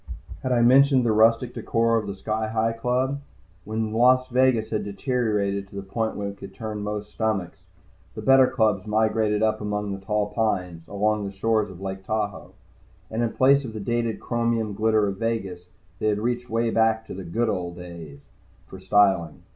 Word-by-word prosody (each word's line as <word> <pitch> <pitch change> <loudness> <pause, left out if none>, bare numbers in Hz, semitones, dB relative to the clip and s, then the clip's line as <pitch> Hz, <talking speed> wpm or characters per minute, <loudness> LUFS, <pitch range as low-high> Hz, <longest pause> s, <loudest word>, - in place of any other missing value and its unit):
Had 130 - -2
I 120 -1 +3
mentioned 130 +1 +5
the 115 - +3
rustic 115 +3 +3
decor 115 0 +1
of 110 -2 -1
the 100 - -4
Sky 110 +3 -2
Hi 110 +1 0
Club? 125 +4 -1 0.4
When 110 0 -2
Las 130 +2 +4
Vegas 125 -3 +2
had 110 - -1
deteriorated 100 -3 -1
to - - -14
the 100 - -5
point 110 +3 -2
where 100 -1 -3
it 100 - -11
would 95 -1 -10
turn 110 -1 -5
most 105 0 -4
stomachs, 105 -5 -2 0.5
the - - -6
better 135 -1 +6
clubs 110 -6 +1
migrated 110 0 +1
up 110 0 +1
among 105 -1 -2
the 95 0 -6
tall 105 0 -1
pines, 90 -7 -1
along 105 +1 0
the - - -6
shores 105 +1 0
of 95 0 -11
Lake 95 0 -5
Tahoe. 105 0 -3 0.6
And 110 +1 -1
in 115 -2 -1
place 140 +2 +4
of 115 -4 -7
the 110 - -5
dated 115 +1 -1
chromium 115 -3 -1
glitter 110 +1 +2
of 100 -1 -3
Vegas, 95 -6 -3 0.3
they - - 0
had 105 -1 +2
reached 120 +3 -2
way 115 0 0
back 110 0 +2
to - - -8
the 95 - -7
"Good 115 +8 -1
old 90 -4 -2
days" 85 -5 -10 0.4
for 95 - -11
styling. 95 -4 +2
110 Hz, 190 wpm, -24 LUFS, 100-115 Hz, 0.6 s, better